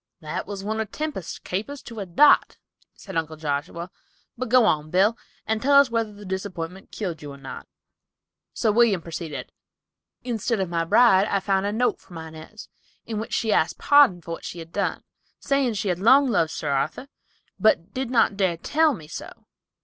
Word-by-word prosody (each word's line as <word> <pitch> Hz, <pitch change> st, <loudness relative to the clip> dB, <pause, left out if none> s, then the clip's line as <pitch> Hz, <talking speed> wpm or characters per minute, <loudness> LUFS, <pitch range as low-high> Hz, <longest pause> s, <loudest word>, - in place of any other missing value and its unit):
"That 155 Hz, -3 st, -5 dB
was 200 Hz, -1 st, -6 dB
one 220 Hz, +2 st, -2 dB
of 220 Hz, -2 st, -3 dB
Tempest's 300 Hz, -, -4 dB
capers 220 Hz, +10 st, -5 dB
to 230 Hz, -2 st, -9 dB
a 195 Hz, -, -5 dB
dot," 290 Hz, +13 st, +5 dB, 0.4 s
said 195 Hz, -, -10 dB
Uncle 160 Hz, -1 st, -2 dB
Joshua, 155 Hz, +4 st, -4 dB, 0.4 s
"but 250 Hz, 0 st, -4 dB
go 250 Hz, -1 st, +6 dB
on, 155 Hz, -6 st, +1 dB
Bill, 195 Hz, +6 st, +3 dB, 0.3 s
and 220 Hz, 0 st, -1 dB
tell 280 Hz, +2 st, +3 dB
us 280 Hz, -4 st, +4 dB
whether 230 Hz, -2 st, 0 dB
the 205 Hz, 0 st, -12 dB
disappointment 190 Hz, -1 st, -5 dB
killed 175 Hz, -7 st, -4 dB
you 145 Hz, -1 st, -8 dB
or 140 Hz, -, -10 dB
not." 135 Hz, -1 st, -9 dB, 0.8 s
So 220 Hz, -, +1 dB
William 210 Hz, -6 st, +3 dB
proceeded: 165 Hz, -3 st, -6 dB, 0.7 s
"Instead 230 Hz, -2 st, -1 dB
of 190 Hz, -2 st, -1 dB
my 165 Hz, -1 st, -1 dB
bride, 195 Hz, +1 st, +5 dB
I 200 Hz, -, +1 dB
found 195 Hz, 0 st, 0 dB
a -, -, -1 dB
note 240 Hz, +4 st, 0 dB
from 175 Hz, -, -12 dB
Inez, 160 Hz, +6 st, -10 dB, 0.4 s
in 220 Hz, -2 st, -4 dB
which 220 Hz, -, -3 dB
she 220 Hz, -2 st, +1 dB
asked 160 Hz, -, +1 dB
pardon 285 Hz, -12 st, +5 dB
for 165 Hz, -, -8 dB
what 165 Hz, -, -6 dB
she -, -, -7 dB
had 165 Hz, 0 st, -9 dB
done, 200 Hz, -, -1 dB, 0.4 s
saying 275 Hz, -5 st, 0 dB
she 205 Hz, 0 st, -2 dB
had 180 Hz, -1 st, -1 dB
long 265 Hz, +7 st, +6 dB
loved 200 Hz, -9 st, +2 dB
Sir 150 Hz, -2 st, -3 dB
Arthur, 145 Hz, -, -1 dB, 0.5 s
but 200 Hz, -3 st, +2 dB
did 260 Hz, -1 st, -3 dB
not 230 Hz, -5 st, +3 dB
dare 190 Hz, -4 st, +1 dB
tell 305 Hz, -, +2 dB
me 160 Hz, -6 st, -12 dB
so. 160 Hz, -, -9 dB
195 Hz, 190 wpm, -24 LUFS, 165-230 Hz, 0.8 s, go